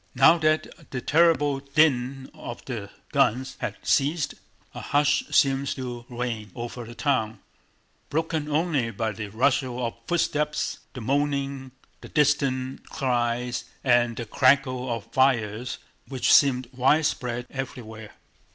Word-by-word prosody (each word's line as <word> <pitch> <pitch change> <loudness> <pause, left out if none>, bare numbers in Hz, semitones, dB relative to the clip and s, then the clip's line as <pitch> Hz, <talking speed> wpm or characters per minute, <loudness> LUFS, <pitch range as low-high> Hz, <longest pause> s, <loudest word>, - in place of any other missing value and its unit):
Now 170 - +6
that 155 0 -1
the 130 - -3
terrible 150 -1 +3
din 135 -2 +1
of 120 - -8
the 110 -6 -5 0.2
guns 130 -2 +1
had - - -3
ceased 150 +2 +1 0.4
a - - -7
hush 145 0 +2
seemed 135 0 +3
to 120 -2 -6
reign 120 -4 -4
over 120 0 -6
the 120 +1 -10
town, 115 -7 0 0.7
broken 160 -1 -1
only 150 -5 +1
by 115 -1 -2
the 105 0 -6
rustle 125 +2 0
of 115 - -3
footsteps, 150 -3 0 0.2
the 130 - -6
moaning, 140 +1 -1 0.3
the - - -10
distant 135 -3 0
cries, 120 -3 -1 0.2
and 120 -2 +3
the 120 - -4
crackle 130 0 +2
of 115 -3 -3
fires 125 -3 +1 0.3
which 130 -3 +2
seemed 130 -3 +5
widespread 125 -2 +1
everywhere. 110 -5 -7
130 Hz, 125 wpm, -25 LUFS, 120-145 Hz, 0.7 s, Now